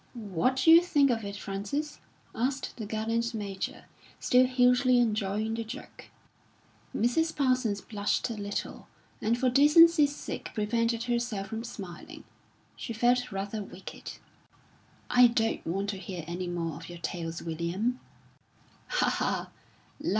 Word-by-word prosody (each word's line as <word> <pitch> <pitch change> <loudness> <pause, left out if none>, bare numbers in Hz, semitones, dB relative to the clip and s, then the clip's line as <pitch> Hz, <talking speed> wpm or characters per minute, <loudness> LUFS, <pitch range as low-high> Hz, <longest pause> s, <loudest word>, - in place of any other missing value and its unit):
"What 215 +2 0
d'you 325 +6 +7
think 290 -6 +3
of 225 -2 -1
it, 200 0 -5
Frances?" 205 +10 -4 0.3
asked 265 +4 -2
the 220 -3 -5
gallant 225 +2 -1
Major, 200 -3 -5 0.3
still 255 +1 +4
hugely 250 0 +4
enjoying 215 -2 0
the 230 0 -2
joke. 220 - -9 0.9
Mrs. 320 +8 +1
Parsons 255 -7 +1
blushed 205 +2 -1
a - - -2
little, 205 -1 -5 0.3
and 230 +2 +1
for 255 +1 +1
decency's 295 +3 +6
sake - - -6
prevented 230 +2 0
herself 235 -5 -2
from 225 +2 -4
smiling; 195 -7 -9 0.5
she 230 - -6
felt 245 +2 +2
rather 200 +2 -3
wicked. 190 -1 -9 0.9
"I 250 0 +7
don't 225 -1 0
want 195 +4 -1
to 195 - -6
hear 185 -3 -6
any 175 +2 -4
more 170 -3 -3
of 165 +1 -10
your 175 - -8
tales, 170 -1 -5
William." 170 +10 -2 0.9
"Ha, - - +1
ha!" - - -1
225 Hz, 135 wpm, -29 LUFS, 200-250 Hz, 0.9 s, d'you